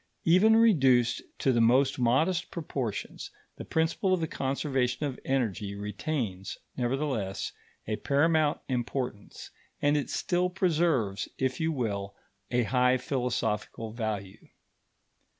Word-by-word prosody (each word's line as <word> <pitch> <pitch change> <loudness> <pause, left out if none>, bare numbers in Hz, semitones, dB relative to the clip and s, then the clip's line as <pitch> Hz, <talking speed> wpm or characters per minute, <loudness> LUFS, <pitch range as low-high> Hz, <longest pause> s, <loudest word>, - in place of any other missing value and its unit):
Even 185 +7 +6
reduced 135 - +4 0.2
to 135 - +2
the 120 - +3
most 130 +4 +3
modest 160 +10 +2
proportions, 135 - -4 0.3
the - - -6
principle 165 +4 +1
of - - -4
the 160 - -1
conservation 135 -1 -1
of 135 -3 -4
energy 110 -6 -1
retains, 105 -1 -3 0.2
nevertheless, 125 -6 -2 0.3
a 110 0 -2
paramount 155 +1 +2
importance; 125 -4 -4 0.3
and 145 +1 +2
it 145 - -1
still 180 -1 0
preserves, 160 - +1
if 130 -1 -1
you 160 0 +1
will, 100 -8 -3 0.3
a 125 0 +2
high 125 +2 +3
philosophical 120 -4 -2
value. 105 -4 -5
130 Hz, 115 wpm, -29 LUFS, 115-155 Hz, 0.3 s, Even